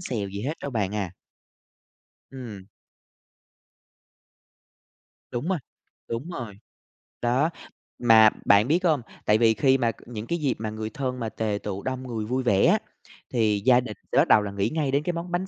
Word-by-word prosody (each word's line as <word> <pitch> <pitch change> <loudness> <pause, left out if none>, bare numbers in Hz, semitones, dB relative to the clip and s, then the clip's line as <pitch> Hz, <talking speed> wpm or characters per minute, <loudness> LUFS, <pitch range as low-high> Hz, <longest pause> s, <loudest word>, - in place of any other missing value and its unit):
xèo 110 - -3
gì 100 +2 -6
hết 150 +5 -2
đâu 140 - -3
bạn 105 -4 -1
à. 100 -4 -2 1.2
Ừm. 110 -7 -9 2.6
Đúng 120 +7 -3
rồi, 190 -3 +1 0.5
đúng 125 +10 -4
rồi, 110 - -7 0.6
đó, 130 +7 +2 0.5
mà 110 -2 +7 0.2
bạn 100 +3 +5
biết 175 +5 +2
hông? 155 -7 +3 0.2
Tại 105 - +4
vì 115 0 +4
khi 130 +5 +3
mà 120 -3 +1
c - - -20
những 115 -2 -6
cái 170 - -1
dịp 140 -5 +1
mà 110 - -3
người 110 0 -5
thân 130 -1 -3
mà 115 -2 -2
tề 105 -2 -2
tựu 100 -1 -4
đông 130 0 -3
người 110 -3 -3
vui 130 +4 -1
vẻ 100 -5 +3
á, - - +4 0.5
thì 110 -4 +2
gia 125 -1 +6
đình 115 -4 -6
sẽ - - +1
bắt - - +5
đầu 105 - +6
là 100 - -4
nghĩ 100 0 -1
ngay 150 -4 0
đến 140 +2 +1
cái 175 +2 -1
món 170 +1 -5
bánh 180 +2 -1
120 Hz, 185 wpm, -25 LUFS, 105-135 Hz, 2.6 s, mà